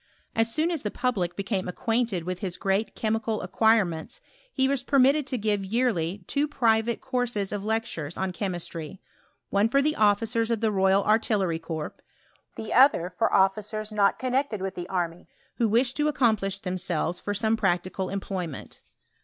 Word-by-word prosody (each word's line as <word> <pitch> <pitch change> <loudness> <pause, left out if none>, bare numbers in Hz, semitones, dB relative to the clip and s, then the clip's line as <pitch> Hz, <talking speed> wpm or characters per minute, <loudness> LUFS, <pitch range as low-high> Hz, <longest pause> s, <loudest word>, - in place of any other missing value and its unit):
As 225 0 +2
soon 315 +6 +1
as 325 -5 -2
the 210 - -2
public 190 -8 -1
became 195 -1 -2
acquainted 225 0 -1
with 180 +1 -4
his 180 -2 -4
great 195 +3 -1
chemical 220 0 -1
acquirements 205 - +1 0.3
he 265 - +1
was 270 -1 0
permitted 275 +1 +3
to 255 - -2
give 210 -2 0
yearly 195 -4 0
two 285 +9 0
private 230 -5 +1
courses 245 -6 -1
of 205 -1 -3
lectures 215 -8 -2
on 190 0 -1
che 200 +3 -2
mistry; 170 -2 -5 0.5
one 200 +3 +3
for 275 +3 +3
the 305 +2 +1
officers 220 +2 +2
of 230 -2 0
the 220 -1 +1
royal 195 0 +3
artillery 210 -6 +1
corps, 160 -2 -5 0.6
the 220 - -5
other 235 -9 +5
for 225 - +1
officers 210 +2 +1
not 205 -2 +2
connected 255 -3 -1
with 190 0 -3
the 175 0 -7
army, 175 -2 -3 0.3
who 230 -2 +2
wished 240 +4 +2
to 300 0 +2
accomplish 220 -9 +1
themselves 180 -3 -2
for 205 - -3
some 220 +1 +2
practical 185 -2 -1
employment. 185 -6 -5
210 Hz, 165 wpm, -26 LUFS, 185-235 Hz, 0.6 s, other